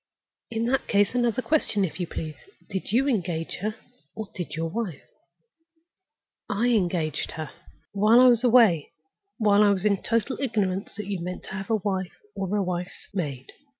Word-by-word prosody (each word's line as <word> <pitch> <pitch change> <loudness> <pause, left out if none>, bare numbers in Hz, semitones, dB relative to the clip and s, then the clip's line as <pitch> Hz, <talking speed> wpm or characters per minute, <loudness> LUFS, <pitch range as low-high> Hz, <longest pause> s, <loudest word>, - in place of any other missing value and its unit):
In 225 -1 -1
that 265 +3 0
case, 205 +1 +3
another 240 0 +1
question, 215 -10 +1
if 165 0 -7
you 175 - -2
please. 155 -1 -5 0.4
Did 190 0 -3
you 260 +5 +3
engage 175 - -1
her, 215 +3 -3 0.4
or 220 -2 -6
did 175 -2 -5
your 165 +1 -1
wife?" 180 -4 -4 1.5
"I 215 +4 +1
engaged 175 -8 0
her—" 155 -2 -6 0.4
"While 215 +4 +5
I 255 - +8
was 240 -1 +4
away? 225 - +5 0.4
While 210 -3 +4
I 210 - +6
was 195 0 +1
in 200 -2 +2
total 230 +3 0
ignorance 200 -7 -1
that 210 0 -5
you 195 -2 -3
meant 180 +1 -5
to - - -10
have 195 +2 -5
a 225 - +3
wife, 190 -3 -2 0.2
or 195 +1 -2
a 205 - +2
wife's 180 0 -4
maid?" 140 -9 -4
200 Hz, 175 wpm, -26 LUFS, 180-225 Hz, 1.5 s, I